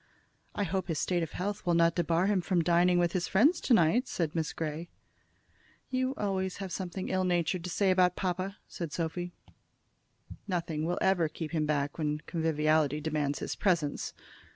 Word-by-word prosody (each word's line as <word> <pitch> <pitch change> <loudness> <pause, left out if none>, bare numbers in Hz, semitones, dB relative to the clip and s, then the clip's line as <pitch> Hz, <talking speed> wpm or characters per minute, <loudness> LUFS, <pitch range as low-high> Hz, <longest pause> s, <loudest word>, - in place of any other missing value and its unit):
"I 205 - 0
hope 190 -1 -2
his 165 -3 -2
state 175 +2 0
of 165 - -4
health 205 +3 -3
will 175 -2 +2
not 170 0 +4
debar 170 +1 +1
him 200 -2 +2
from 175 -1 +1
dining 175 +1 +4
with 175 -1 +2
his 175 -1 -1
friends 285 - +4
to 255 - +2
night," 220 - +3
said 165 -4 -2
Miss 160 -2 -1
Grey. 160 +1 -4 1.0
"You 260 +1 0
have - - -25
always 190 -1 -2
something 185 0 -4
ill 185 0 +1
natured 175 -1 0
to - - -3
say 190 +2 +2
about 180 -1 +3
papa," 185 +1 -2
said 170 -4 -5
Sophy. 175 +2 -3 1.2
"Nothing 165 -4 -2
will 175 - -1
ever 175 -4 +3
keep 155 0 -6
him 155 -2 0
back 145 0 -1
when 150 -1 0
conviviality 155 -2 +1
demands 150 -2 -1
his - - -4
presence." 170 -7 0
175 Hz, 175 wpm, -30 LUFS, 160-185 Hz, 1.2 s, not